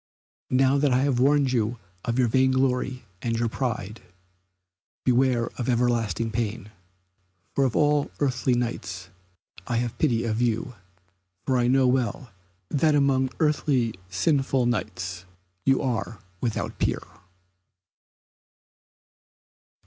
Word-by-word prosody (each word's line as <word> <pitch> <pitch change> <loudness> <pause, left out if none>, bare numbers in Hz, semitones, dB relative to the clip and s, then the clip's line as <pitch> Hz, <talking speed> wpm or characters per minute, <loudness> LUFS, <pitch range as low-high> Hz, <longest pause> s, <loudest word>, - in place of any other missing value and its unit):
Now 135 +2 +3
that 145 -1 +2
I 125 +1 +3
have 135 -3 +1
warned 140 0 +3
you 115 0 0 0.3
of 115 0 -1
your 125 -2 +3
vain 130 +3 +3
glory 130 -1 0 0.2
and 115 -1 -1
your 115 0 +1
pride, 110 -3 -3 1.0
beware 125 -2 +2
of 125 - -1
everlasting 115 -2 +1
pain, 110 -2 -3 0.8
for 135 - +2
of 125 - -1
all 150 -1 +2
earthly 130 -3 +1
Knights 100 -6 -3 0.6
I 120 - 0
have 120 0 -2
pity 120 -7 +2
of 110 0 -1
you, 120 +1 0 0.7
for 130 - +1
I 120 - +2
know 130 +1 +4
well 125 -1 0 0.4
that 150 +1 +2
among 135 -2 +2
earthly 145 -7 +1 0.2
sinful 135 - +1
Knights 95 -5 -3 0.4
you 135 +1 +3
are 115 -3 -2 0.2
without 115 -3 -2
peer." - - 0
125 Hz, 120 wpm, -25 LUFS, 115-135 Hz, 1.0 s, know